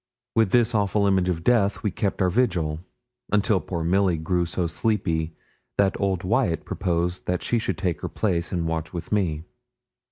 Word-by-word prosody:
With 110 -3 +4
this 120 +2 +3
awful 100 -1 +2
image 95 -2 +2
of 85 -2 -2
death 105 -4 +2
we 105 - 0
kept 95 0 -1
our 90 - +2
vigil, 85 -9 +1 0.5
until 105 -1 +3
poor 85 -3 -4
Milly 90 0 +2
grew 85 +2 0
so 90 +1 -1
sleepy 80 -3 -1 0.4
that 100 -1 +3
old 95 -2 0
Wyat 95 - +1
proposed 90 -1 -1
that 90 0 -1
she 120 - +1
should - - -2
take 85 -6 -2
her - - -3
place 85 -5 -1
and 85 -3 -1
watch 80 0 -3
with 85 -2 -6
me. 85 -7 0
90 Hz, 180 wpm, -25 LUFS, 85-100 Hz, 0.5 s, With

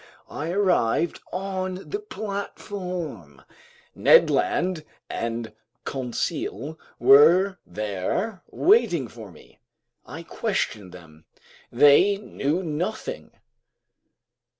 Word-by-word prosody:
I 155 +3 -4
arrived 175 - +1
on 185 0 -4
the 410 - -2
platform. 180 - -6 0.5
Ned - - +5
Land 175 -3 0 0.3
and 115 -1 -4 0.3
Conseil 135 +2 -4 0.2
were 175 +8 +6
there 105 - -3
waiting 195 - +3
for 110 -3 -11
me. 80 - -19 0.4
I 165 +3 -9
questioned 165 - -3
them. 80 -3 -15 0.5
They 145 +10 +5
knew 180 -4 -2
nothing. 175 +7 -4
165 Hz, 80 wpm, -24 LUFS, 115-190 Hz, 0.5 s, were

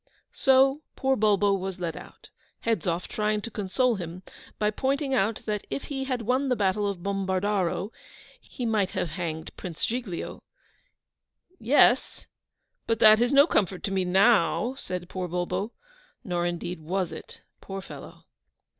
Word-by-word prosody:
So 270 +2 +4
poor 265 0 +1
Bulbo 205 -2 +3
was 190 -1 -3
led 170 -3 -3
out, - - -13 0.3
Hedzoff 180 -6 -1
trying 210 0 0
to 230 - -6
console 225 +4 +1
him, 175 0 -7 0.3
by 210 0 +1
pointing 270 +4 -1
out 220 -2 +1
that 210 -2 -3
if 275 - -3
he 270 -2 -4
had 255 -3 -2
won 260 +4 +1
the 250 - +3
battle 205 -1 +1
of 185 -3 -6
Bombardaro, 195 0 0 0.5
he 245 - -6
might 215 -4 +1
have 170 - 0
hanged 160 -1 -5
Prince 170 -3 -3
Giglio. 230 -7 -4 1.2
'Yes! 250 +1 +3 0.6
But 225 - +1
that 215 0 +7
is 240 - +2
no 280 +1 +7
comfort 195 - 0
to 195 - -2
me 190 -1 +1
now!' 195 +4 +3
said 180 -1 -5
poor 185 0 -4
Bulbo; 180 +4 -2 0.5
nor 175 -5 -1
indeed 175 0 -4
was 175 +2 -2
it, 160 - -10 0.2
poor 195 0 -6
fellow! 190 - -11
200 Hz, 150 wpm, -27 LUFS, 180-240 Hz, 1.2 s, that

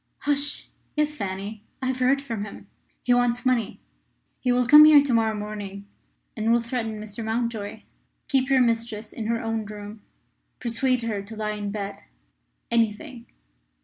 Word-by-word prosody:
"Hush! 290 0 0 0.3
Yes, 300 0 +1
Fanny; 200 -3 -5 0.2
I 260 - -4
have 260 0 -1
heard 270 +2 +3
from 230 -6 -4
him. 210 - -9 0.4
He 245 - +3
wants 245 +1 +1
money. 250 -4 +1 0.6
He 250 - +1
will 250 0 +3
come 300 +5 +10
here 300 -2 +8
to 275 -4 0
morrow 225 -1 +2
morning, 205 -1 -6 0.5
and 220 +1 +1
will 235 - +5
threaten 230 -2 -3
Mr. 215 +1 -6
Mountjoy. 220 -2 -3 0.4
Keep 270 -2 +1
your 265 -1 +5
mistress 230 -2 -1
in 220 -2 -4
her 230 0 0
own 225 -1 -2
room. 210 0 -9 0.6
Persuade 245 +1 +1
her 215 -3 -2
to 205 +3 -10
lie 215 0 -2
in 205 -1 -4
bed 200 -1 -5 0.7
anything." 235 +2 -1
230 Hz, 160 wpm, -25 LUFS, 210-255 Hz, 0.7 s, come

